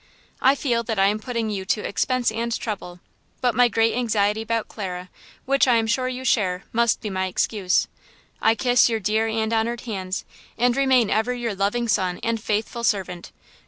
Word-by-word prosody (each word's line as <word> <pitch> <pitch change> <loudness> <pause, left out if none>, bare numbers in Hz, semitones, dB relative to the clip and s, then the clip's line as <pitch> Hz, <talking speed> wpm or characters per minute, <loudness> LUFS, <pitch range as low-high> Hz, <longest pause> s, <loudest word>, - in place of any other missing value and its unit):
I 265 +2 +5
feel 240 -5 0
that 225 -2 -2
I 195 - +4
am 210 +1 -1
putting 230 -1 -3
you 195 -2 -3
to 210 +2 -1
expense 255 +2 0
and 230 +1 -3
trouble, 180 -5 -6 0.4
but 245 -2 +1
my 245 +2 +5
great 225 0 +2
anxiety 215 -3 +1
about 230 0 -2
Clara, 185 -3 -6 0.3
which 275 0 +3
I 245 - +5
am 225 -1 +2
sure 255 +3 0
you 255 0 -5
share, 185 -6 +1
must 235 0 +2
be 210 - -4
my 190 0 -1
excuse. 185 0 +1 0.5
I 225 0 +4
kiss 245 0 +4
your 225 -1 0
dear 215 +2 +1
and 220 0 -1
honored 230 +1 0
hands, 190 -5 -4 0.3
and 245 0 +2
remain 260 -5 +3
ever 230 +3 +1
your 240 -3 -3
loving 205 +5 0
son 185 -4 0
and 230 -1 -1
faithful 220 +3 -2
servant. 185 -5 -1
225 Hz, 190 wpm, -23 LUFS, 200-240 Hz, 0.5 s, I